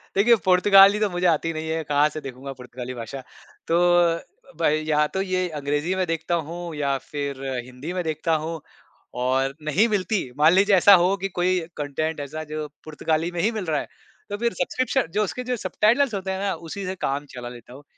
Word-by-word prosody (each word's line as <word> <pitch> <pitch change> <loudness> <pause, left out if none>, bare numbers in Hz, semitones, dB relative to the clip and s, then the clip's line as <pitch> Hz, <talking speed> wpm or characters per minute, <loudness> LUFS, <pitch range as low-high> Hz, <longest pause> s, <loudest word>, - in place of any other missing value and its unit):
देखिए, 235 +4 +5
पुर्तगाली 195 +2 +6
तो 210 -2 +1
मुझे 175 0 -2
आती 165 0 +1
नहीं 160 0 -5
है, 160 0 -1
कहाँ 145 0 +3
से 155 0 -7
देखूँगा 135 +1 -7
पुर्तगाली 125 0 -7
भाषा। 120 +3 -7 0.5
तो 165 - +2 0.4
अ, - - -7 0.4
भई 155 +1 +2
या 150 -1 +3
तो 190 - +1
ये 185 -1 0
अंग्रेज़ी 150 +3 -2
में 185 -1 0
देखता 165 +1 -1
हूँ 170 0 -6
या 140 -2 0
फिर 140 -2 -4 0.2
हिंदी 130 +7 -7
में 180 -1 -2
देखता 160 +1 -1
हूँ 165 0 -4 0.6
और 135 +1 +1
नहीं 200 +10 +4
मिलती 210 0 0 0.2
मान 155 +2 +6
लीजिए 200 +1 +5
ऐसा 200 +2 +7
हो 190 +2 +3
कि 195 +1 -3
कोई 180 +1 +2 0.2
कंटेंट 150 +2 -2
ऐसा 150 +2 -5
जो 155 -1 -3 0.2
पुर्तगाली 160 +2 -1
में 175 - -5
ही 220 - +2
मिल 215 -5 -4
रहा 155 -2 0
है, - - -6 0.4
तो 205 - -3
फिर 235 -1 0
सब्सक्रिप्शन 255 +5 0
जो 215 - +4
उसके 250 +5 -4
जो 250 - +1
सबटाइटल्स 225 +6 +2
होते 190 -1 -3
हैं 190 - -3
ना, 200 -1 0
उसी 170 +4 -7
से 185 +1 -3
काम 140 +2 -2
चला 120 -1 -6
लेता 120 0 -12
हूँ। 140 +2 -12
165 Hz, 205 wpm, -24 LUFS, 145-190 Hz, 0.6 s, ऐसा